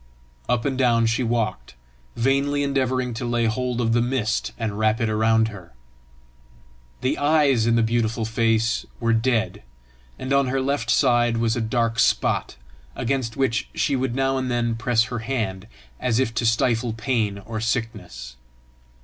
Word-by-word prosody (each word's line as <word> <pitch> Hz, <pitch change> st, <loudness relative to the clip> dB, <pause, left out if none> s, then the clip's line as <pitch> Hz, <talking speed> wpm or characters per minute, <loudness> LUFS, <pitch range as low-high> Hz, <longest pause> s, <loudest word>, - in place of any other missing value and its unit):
Up 120 Hz, -2 st, +1 dB
and 135 Hz, -2 st, 0 dB
down 120 Hz, -3 st, +3 dB
she 115 Hz, +3 st, +1 dB
walked, 115 Hz, -, -2 dB, 0.4 s
vainly 140 Hz, +3 st, +1 dB
endeavouring 130 Hz, -3 st, 0 dB
to 120 Hz, +3 st, -5 dB
lay 120 Hz, -1 st, 0 dB
hold 125 Hz, +2 st, -1 dB
of 115 Hz, -1 st, +1 dB
the 120 Hz, -, +3 dB
mist 120 Hz, -3 st, -1 dB
and 110 Hz, -3 st, -3 dB
wrap 110 Hz, 0 st, +2 dB
it 115 Hz, -, 0 dB
around 110 Hz, +1 st, +2 dB
her. 90 Hz, -, -12 dB, 1.3 s
The 130 Hz, -, 0 dB
eyes 145 Hz, -6 st, +3 dB
in 115 Hz, -, +3 dB
the 115 Hz, -, +3 dB
beautiful 115 Hz, 0 st, 0 dB
face 115 Hz, 0 st, +1 dB, 0.2 s
were 115 Hz, -1 st, +1 dB
dead, 115 Hz, -1 st, 0 dB, 0.6 s
and 130 Hz, +1 st, -3 dB
on 140 Hz, -1 st, +3 dB
her 135 Hz, +1 st, 0 dB
left 130 Hz, -3 st, -1 dB
side 120 Hz, -3 st, +3 dB
was 115 Hz, -1 st, +1 dB
a 120 Hz, -, -1 dB
dark 115 Hz, +1 st, 0 dB
spot, -, -, +1 dB, 0.4 s
against 125 Hz, -1 st, -2 dB
which 125 Hz, -5 st, 0 dB
she 140 Hz, -, +1 dB
would 130 Hz, -2 st, -1 dB
now 135 Hz, 0 st, +1 dB
and 130 Hz, -1 st, -3 dB
then 120 Hz, -1 st, 0 dB
press 115 Hz, 0 st, +2 dB
her 120 Hz, +1 st, -4 dB
hand, 110 Hz, -6 st, -3 dB, 0.3 s
as 120 Hz, -2 st, 0 dB
if 115 Hz, -4 st, 0 dB
to 115 Hz, +1 st, 0 dB
stifle 115 Hz, 0 st, +1 dB
pain 115 Hz, -3 st, -1 dB
or 110 Hz, +2 st, -6 dB
sickness. 100 Hz, -, -4 dB
115 Hz, 165 wpm, -23 LUFS, 110-130 Hz, 1.3 s, down